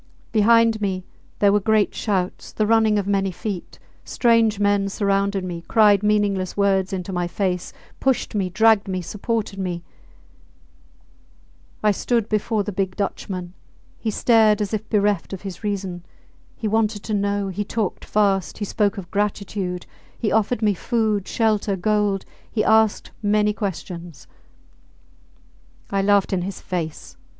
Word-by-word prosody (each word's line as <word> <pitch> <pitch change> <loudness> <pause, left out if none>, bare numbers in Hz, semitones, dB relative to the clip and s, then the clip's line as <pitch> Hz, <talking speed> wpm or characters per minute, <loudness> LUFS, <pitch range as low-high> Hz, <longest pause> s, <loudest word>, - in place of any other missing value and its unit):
Behind 225 0 +4
me 185 -2 -2 0.3
there 200 -1 +4
were 205 - +4
great 215 0 +2
shouts, 190 -4 -2
the 215 - 0
running 220 -1 +3
of 200 - 0
many 195 -1 +1
feet; 185 0 -6 0.3
strange 230 -3 +2
men 205 -1 +2
surrounded 200 -1 0
me, 175 -2 -5
cried 210 -3 +5
meaningless 205 -3 +1
words 195 -1 +2
into 190 0 -4
my 175 -1 -1
face, 180 0 -2 0.3
pushed 265 -3 0
me, 195 -3 0
dragged 220 +2 +4
me, 185 -1 -2
supported 210 +1 -3
me... 175 -2 -3 2.0
I 210 - +5
stood 230 +2 0
before 215 0 0
the 210 - -4
big 190 -1 -2
Dutchman: 185 -3 -4 0.5
he 225 - -2
stared 220 -1 +4
as 210 0 -2
if 215 0 -3
bereft 205 -3 +1
of 190 - -7
his 190 -2 -7
reason. 190 -4 -3 0.5
He 220 - -3
wanted 215 -1 0
to 215 - -3
know, 200 -1 0
he 190 +2 -2
talked 210 -1 -3
fast, 200 -3 +1
he 205 - -3
spoke 205 0 0
of 180 -3 -8
gratitude, 200 -3 -2 0.3
he 215 - -1
offered 220 +1 +1
me 210 -1 +4
food, 215 -1 0
shelter, 215 -3 +1
gold 205 0 0 0.3
he 215 - 0
asked 220 -1 +3
many 210 0 +2
questions. 175 - -6 1.7
I 195 0 +1
laughed 200 0 +3
in 185 - +1
his 190 +2 -5
face. 165 -4 -5
205 Hz, 145 wpm, -22 LUFS, 190-215 Hz, 2.0 s, cried